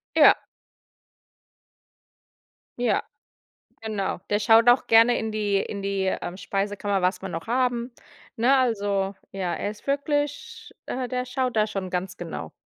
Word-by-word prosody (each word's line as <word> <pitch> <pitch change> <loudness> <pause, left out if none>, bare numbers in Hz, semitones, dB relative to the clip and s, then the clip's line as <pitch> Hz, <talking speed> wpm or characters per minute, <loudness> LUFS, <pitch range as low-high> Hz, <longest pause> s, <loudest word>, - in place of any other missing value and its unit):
Ja. - - +8 2.4
Ja, 245 - +1 0.8
genau. 215 -3 -3
Der 205 0 +1
schaut 225 +2 +5
auch 245 +1 +5
gerne 230 +2 +6
in 220 - -3
die 210 -2 0
in 200 -1 -5
die, 195 -1 -1
ähm, 175 - -5
Speisekammer, 200 0 -2
was 185 +1 0
wir 195 - -4
noch 165 +3 -6
haben. 245 0 0 0.4
Ne? 255 +4 +4
Also, 200 -6 0 0.2
ja, 185 -3 -2
er 205 - -3
ist 210 0 -13
wirklich 290 - -2
äh, 255 0 -3
der 250 0 -2
schaut 255 0 -2
da 215 0 +3
schon 195 -3 -4
ganz 180 0 -3
genau. 160 - -6
215 Hz, 140 wpm, -25 LUFS, 195-250 Hz, 2.4 s, Ja